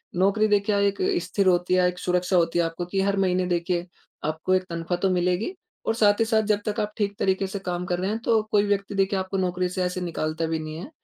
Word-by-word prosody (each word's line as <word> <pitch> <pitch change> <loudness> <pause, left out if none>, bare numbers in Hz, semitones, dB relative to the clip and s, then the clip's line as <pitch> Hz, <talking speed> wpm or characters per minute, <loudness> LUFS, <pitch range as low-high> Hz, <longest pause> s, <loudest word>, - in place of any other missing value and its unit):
नौकरी 200 +4 +3
देखिए 205 -1 +3
क्या 205 -1 +2
एक 200 - -1 0.3
स्थिर 200 -2 0
होती 180 0 +2
है, 180 -1 +4
एक 180 0 -3
सुरक्षा 180 +1 0
होती 170 0 +2
है 170 - +3
आपको, 165 +2 -4
कि 190 +2 -1
हर 200 +1 +1
महीने 185 -1 +2
देखिए 175 0 -1 0.4
आपको 160 +4 -1
एक 185 - +3
तनख्वाह 170 +1 -2
तो 195 - +3
मिलेगी। 180 - 0 0.3
और 225 - +1
साथ 205 -2 +4
ही 225 - +3
साथ 220 -1 +2
जब 210 -1 +1
तक 210 +1 -1
आप 210 0 -1
ठीक 205 -1 -1
तरीके 190 0 +1
से 195 +1 -5
काम 180 -2 -3
कर 175 0 -1
रहे 190 +2 -1
हैं 220 +2 -2
तो 225 -1 +4
कोई 205 -1 +4
व्यक्ति 200 0 -1
देखिए 195 0 +1
आपको 190 +1 -3
नौकरी 180 -1 0
से 185 0 -2
ऐसे 180 0 -2
निकालता 165 -2 -2
भी 160 0 -1
नहीं 155 0 -6
है। 180 - -7
185 Hz, 255 wpm, -25 LUFS, 175-200 Hz, 0.4 s, है